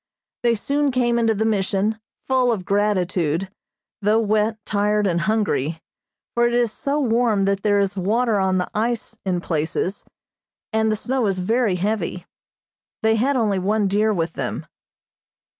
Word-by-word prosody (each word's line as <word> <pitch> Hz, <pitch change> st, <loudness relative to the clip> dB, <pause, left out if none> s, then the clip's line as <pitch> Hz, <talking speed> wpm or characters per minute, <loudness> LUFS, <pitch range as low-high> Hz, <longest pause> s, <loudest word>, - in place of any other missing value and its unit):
They 235 Hz, -1 st, +3 dB
soon 280 Hz, +6 st, 0 dB
came 240 Hz, -2 st, +1 dB
into 225 Hz, -1 st, +2 dB
the 220 Hz, +2 st, 0 dB
Mission, 205 Hz, 0 st, 0 dB, 0.3 s
full 255 Hz, -2 st, +3 dB
of 195 Hz, -6 st, -3 dB
gratitude, 190 Hz, -4 st, 0 dB, 0.5 s
though 210 Hz, +2 st, +3 dB
wet, 215 Hz, 0 st, +1 dB
tired 210 Hz, 0 st, +1 dB
and 175 Hz, -3 st, +1 dB
hungry, 185 Hz, -8 st, 0 dB, 0.5 s
for 240 Hz, 0 st, +3 dB
it 240 Hz, -, 0 dB
is 240 Hz, -2 st, +2 dB
so 280 Hz, +6 st, -2 dB
warm 230 Hz, -6 st, +2 dB
that 195 Hz, 0 st, 0 dB
there 205 Hz, -1 st, +2 dB
is 200 Hz, 0 st, 0 dB
water 215 Hz, +3 st, +1 dB
on 190 Hz, -1 st, +1 dB
the 180 Hz, -, -2 dB
ice 225 Hz, +1 st, -2 dB
in 180 Hz, -2 st, 0 dB
places, 165 Hz, +4 st, -2 dB, 0.7 s
and 220 Hz, 0 st, +2 dB
the -, -, +1 dB
snow 245 Hz, +2 st, -1 dB
is 195 Hz, -1 st, 0 dB
very 220 Hz, +2 st, +1 dB
heavy. 180 Hz, -2 st, -2 dB, 0.8 s
They 220 Hz, 0 st, +4 dB
had 270 Hz, +5 st, +1 dB
only 210 Hz, -6 st, +1 dB
one 205 Hz, +2 st, +1 dB
deer 210 Hz, +3 st, +2 dB
with 165 Hz, -4 st, -1 dB
them. -, -, -4 dB
210 Hz, 160 wpm, -22 LUFS, 190-230 Hz, 0.8 s, They